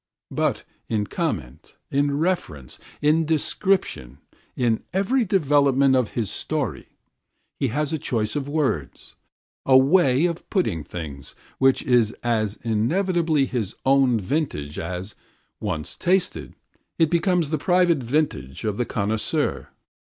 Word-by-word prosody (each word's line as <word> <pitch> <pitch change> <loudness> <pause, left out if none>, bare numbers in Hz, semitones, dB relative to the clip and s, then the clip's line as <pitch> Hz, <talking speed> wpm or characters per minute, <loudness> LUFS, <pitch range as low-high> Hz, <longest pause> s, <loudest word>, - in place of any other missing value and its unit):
But - - 0 0.3
in 105 -2 0
comment, 95 - -4 0.2
in 140 0 +1
reference, 145 - -2 0.2
in 155 +2 +4
description, 155 - 0 0.4
in 115 -3 +1
every 210 +7 +1
development 140 -7 +3
of 125 -4 0
his 110 -5 -1
story, - - -3 0.7
he 135 - +1
has 145 +5 -1
a 160 - -1
choice 110 -3 -2
of 145 -1 -2
words, 140 - -2 0.5
a 130 -1 +6
"way 140 0 +4
of 170 -1 -3
putting 110 - 0
things" 70 -4 -8 0.2
which 135 0 +3
is 120 -3 +3
as 110 -3 0
inevitably 155 - +1
his 115 -6 -3
own 135 -3 +4
vintage 90 - -2
as, 90 +4 -5 0.5
once 85 -8 -3
tasted, 175 - 0 0.4
it 160 -2 +3
becomes 175 -3 +1
the 155 - 0
private 175 -1 +3
vintage 125 - -2
of 105 -1 -1
the 125 - 0
connoisseur. 105 0 -1
135 Hz, 125 wpm, -23 LUFS, 105-160 Hz, 0.7 s, a